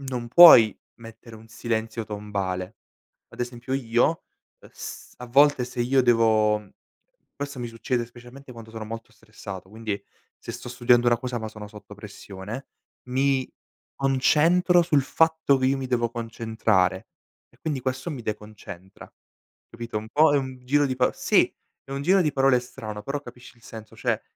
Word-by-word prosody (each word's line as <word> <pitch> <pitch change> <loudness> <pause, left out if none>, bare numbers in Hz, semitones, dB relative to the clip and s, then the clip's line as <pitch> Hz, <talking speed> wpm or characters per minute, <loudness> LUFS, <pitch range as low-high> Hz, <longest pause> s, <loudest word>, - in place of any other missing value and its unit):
non 125 -3 -5
puoi 120 - +9 0.2
mettere 115 0 -12
un 110 +1 -16
silenzio 115 0 -3
tombale, 100 -2 -4 0.5
ad - - -12
esempio 120 +2 -4
io, 120 -2 +2 0.5
uhm, - - -17
s - - -9
a 125 - -8
volte 140 +1 +4
se 125 0 -6
io 130 +2 +3
devo 110 -3 +3 0.7
forse 140 -1 -6
mi 120 - -4
succede 120 +1 -2
specialmente 125 +3 -14
quando 115 -2 -12
sono 110 -1 -7
molto 115 +1 -8
stressato, 100 -4 -10
quindi 110 -2 -5 0.4
se - - -8
sto - - -8
studiando 120 0 +3
una 120 -1 +3
cosa 125 0 -4
ma 110 -1 -5
sono 105 -1 -10
sotto 105 -1 -13
pressione, 105 +3 -9 0.4
mi 135 0 +1 0.5
concentro 155 +7 +3
sul 155 -5 +2
fatto 160 -1 +2
che 130 - +1
io 135 +1 +2
mi 135 - -4
devo 120 -2 0
concentrare, 110 -5 -1 0.4
e - - -27
quindi 150 -4 -3
questo 130 +5 -3
mi 135 -6 -6
deconcentra, 105 -4 -8 0.6
capito? 115 -2 -5
Un 110 +1 -9
po' 150 +3 +4
è - - +4
un 130 -2 -6
giro 145 +3 +2
di 130 -1 -3
paro 125 0 +2
sì, - - +2 0.3
è 135 - -9
un 140 0 -3
giro 185 +5 +4
di 150 -3 0
parole 135 -2 +3
strano, 110 -4 -8
però 140 +6 -4
capisci 125 -2 -14
il 115 - -26
senso, 110 -1 -11
cioè - - -1
120 Hz, 170 wpm, -25 LUFS, 110-135 Hz, 0.7 s, puoi